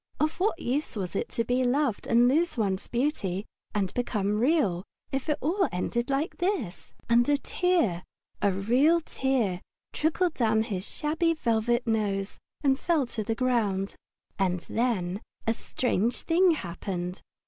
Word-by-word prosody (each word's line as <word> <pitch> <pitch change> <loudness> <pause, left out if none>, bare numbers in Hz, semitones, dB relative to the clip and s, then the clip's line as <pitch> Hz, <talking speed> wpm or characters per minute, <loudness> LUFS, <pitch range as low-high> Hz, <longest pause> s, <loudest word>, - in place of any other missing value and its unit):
Of 310 +3 0
what 390 -1 +1
use 275 +1 -1
was 190 -2 -4
it - - -1
to 230 - -1
be 250 +2 +1
loved 255 -2 +1
and 240 +1 +5
lose 320 +4 +2
one's 195 -4 0
beauty 230 - -1 0.3
and 195 -3 0
become 210 -4 0
Real 240 - +2 0.3
if 270 +3 -2
it 300 - +2
all 375 +5 +1
ended 235 +7 -1
like 275 +5 -1
this? 350 - -2 0.2
And 240 +3 +4
a 290 - +4
tear, 285 - +1 0.4
a 200 - +3
real 250 - +3
tear, 250 - 0 0.3
trickled 330 +2 +1
down 220 -4 +2
his 220 -2 -5
little - - -8 0.2
shabby 330 +1 +2
velvet 235 -3 +1
nose 205 -3 -1 0.2
and 270 -1 +3
fell 330 -6 +2
to 230 -2 -4
the 225 +2 -1
ground. 220 -6 0 0.5
And 180 -2 +1
then 205 -5 -1 0.2
a 225 - +2
strange 235 -1 -1
thing 360 +3 +4
happened. 180 - -3
240 Hz, 155 wpm, -28 LUFS, 200-295 Hz, 0.5 s, and